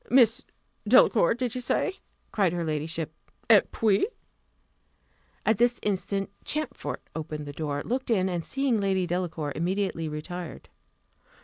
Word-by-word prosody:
"Miss 245 0 +5 0.4
Delacour, 230 -4 +6
did 245 -1 -2
you 255 - -3
say?" 380 +9 0 0.3
cried 195 -5 +2
her 175 -1 -1
ladyship: 155 +1 -2 0.4
"Et 210 -3 +6
puis?" 215 - +2 1.4
At 220 -1 +3
this 240 0 +3
instant 195 0 -1
Champfort 305 +1 -3
opened 155 -2 -4
the 145 - -7
door, 145 -1 -3
looked 255 +2 -2
in, 190 -5 +3
and 175 -2 -2
seeing 270 -1 +1
Lady 190 -2 +1
Delacour, 170 -4 -2
immediately 175 -1 -1
retired. 170 +3 -6
190 Hz, 130 wpm, -27 LUFS, 165-230 Hz, 1.4 s, Delacour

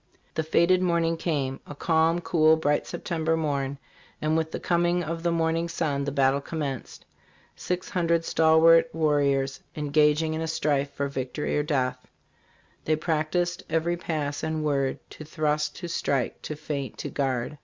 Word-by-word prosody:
"The - - 0
fated 170 +3 +3
morning 170 -2 +1
came 145 -5 -2
a 145 - -8
calm, 165 +2 +2
cool, 160 -2 +4
bright 150 -2 0
September 160 -1 -1
morn, 140 -3 -1 0.4
and 155 +1 0
with 160 0 0
the - - -4
coming 175 0 +1
of 165 +1 -4
the 170 0 +1
morning 165 0 0
sun 150 -5 -1
the 140 - -2
battle 135 0 +2
commenced. 140 -5 -5 0.5
Six 180 0 -3
hundred 170 -3 +1
stalwart 165 +1 +5
warriors 140 -4 +1 0.2
engaging 150 +1 +2
in 160 - -3
a 160 - -2
strife 145 -3 0
for 140 - -2
victory 135 +1 -3
or 150 - +2
death. 135 -4 -1 0.2
' - - -35
' - - -36
They 155 - +2
practiced 170 +3 -1
every 165 +2 +1
pass 150 -4 -3
and 160 -1 -2
word 140 -3 0
To - - -9
thrust, 150 -1 -1
to 175 - -6
strike, 140 -6 -1
to 155 - -5
feint, 145 -4 -5
to - - -5
guard. 135 +1 -2
155 Hz, 165 wpm, -26 LUFS, 145-165 Hz, 0.5 s, stalwart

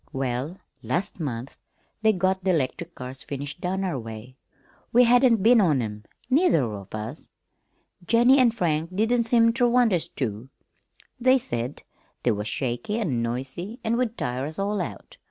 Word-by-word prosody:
"Well, 135 +6 -2 0.2
last 130 - -2
month 130 -4 -5 0.4
they 220 0 +5
got 190 -1 0
the 185 -1 +2
'lectric 165 +3 -2
cars 130 +1 -8
finished 145 +4 -6
down 190 +2 -1
our 175 -8 -2
way. 115 +2 -9 0.6
We 245 +2 +6
hadn't 245 -3 +4
been 230 0 +6
on 155 -8 +3
'em, 105 -2 -5 0.2
neither 275 - +3
of 105 -3 -6
us. 110 +8 -7 0.8
Jennie 240 +4 +5
an' 250 -2 +6
Frank 170 -5 -1
didn't 230 +3 +2
seem 230 0 +4
ter 245 0 +3
want 240 -3 +3
us 170 - 0
to. 115 -1 -4 0.7
They 255 +2 +5
said 120 - -4 0.4
they 120 - +3
was 105 0 -3
shaky 125 - -2
an' 140 - -1
noisy 135 - -4
an' 225 0 +1
would 240 -2 -1
tire 125 +2 -2
us 155 - -7
all 200 0 -1
out. 105 - -7
170 Hz, 165 wpm, -25 LUFS, -, 0.8 s, We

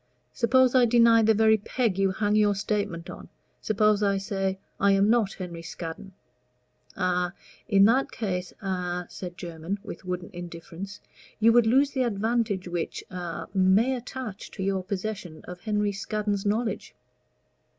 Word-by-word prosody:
Suppose 255 +1 +4
I 255 -2 +6
deny 230 -1 +6
the 220 0 +4
very 220 +1 +5
peg 210 -2 -1
you 195 0 +3
hang 205 +2 0
your 210 -1 +4
statement 195 -4 -2
on. - - -9 0.3
Suppose 215 -1 +2
I 200 -1 +2
say 195 -1 -2 0.2
I 200 0 +4
am 200 +2 +4
not 225 -5 +2
Henry 175 -3 -6
Scaddon." 170 +3 -7 0.8
"A 180 -1 0 0.3
in 200 -3 +6
that 255 +5 +3
case 185 -4 -3
a," 180 -2 -2
said 175 -2 -8
Jermyn, 170 +3 -5
with - - -8
wooden 180 +1 -4
indifference, 175 +3 -8 0.4
"you 225 +1 +5
would 240 -1 +5
lose 275 +5 +4
the 265 - -1
advantage 220 -3 0
which 175 -1 -3
a 175 -2 -5
may 195 +7 +4
attach 245 -4 -7
to 190 - -4
your 190 -1 0
possession 190 -3 -5
of 180 0 -9
Henry 210 0 0
Scaddon's 205 0 -2
knowledge. 220 +2 -2
200 Hz, 150 wpm, -26 LUFS, 185-220 Hz, 0.8 s, I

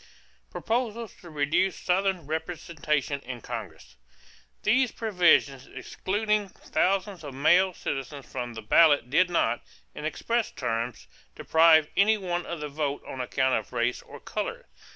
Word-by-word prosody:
=Proposals 230 -2 -2
to 175 - -13
Reduce 155 +5 +1
Southern 190 -1 0
Representation 155 -3 -2
in 125 -2 -7
Congress.= 105 - -8 0.7
These 250 +2 +3
provisions 175 - +2
excluding 210 +1 -1
thousands 190 -1 -1
of 140 -3 -8
male 175 +7 +4
citizens 135 0 -5
from 120 -2 -6
the 110 - -7
ballot 145 +1 +4
did 180 +4 +4
not, 120 -9 +1 0.3
in - - -8
express 230 +9 -1
terms, 120 -2 -3 0.3
deprive 160 -1 +5
any 215 +2 +4
one 175 -3 -3
of 170 -1 -5
the 150 - -3
vote 145 -1 -3
on 130 - -5
account 130 +1 0
of 110 - -12
race 120 0 0
or - - -12
color. - - -5
160 Hz, 135 wpm, -27 LUFS, 135-190 Hz, 0.7 s, deprive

